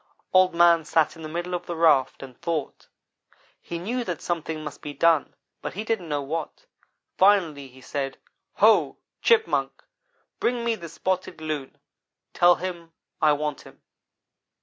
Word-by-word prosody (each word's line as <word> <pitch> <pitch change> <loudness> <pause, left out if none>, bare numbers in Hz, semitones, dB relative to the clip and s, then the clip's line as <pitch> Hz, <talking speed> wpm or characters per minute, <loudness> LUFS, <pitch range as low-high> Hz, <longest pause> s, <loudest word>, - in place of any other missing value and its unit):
"Old 185 -1 +5
man 170 -1 +5
sat 155 +1 +1
in 165 - -12
the 155 - -6
middle 175 +3 -4
of 175 0 -4
the 175 - -3
raft 150 -6 +3
and 130 -2 -11
thought. 160 -4 -3 0.7
He 170 - -6
knew 235 +9 -2
that 175 -4 -3
something 160 -2 -3
must 150 - -8
be 145 -1 -7
done, 165 +1 +2 0.3
but - - -6
he 210 - -3
didn't 220 -7 -2
know 145 -1 -1
what. 155 +3 -5 0.5
Finally 175 -8 +3
he 130 0 -17
said: 135 +1 -4 0.4
'Ho! - - +4 0.2
Chipmunk, 450 -1 +2 0.6
bring 240 -1 0
me 235 - +2
the 170 -7 -7
Spotted 185 +1 -3
Loon. 155 -4 -5 0.6
Tell 175 0 +5
him 175 -3 -6 0.3
I 155 -1 +5
want 150 0 -3
him.' - - -16
165 Hz, 155 wpm, -25 LUFS, 150-180 Hz, 0.7 s, Old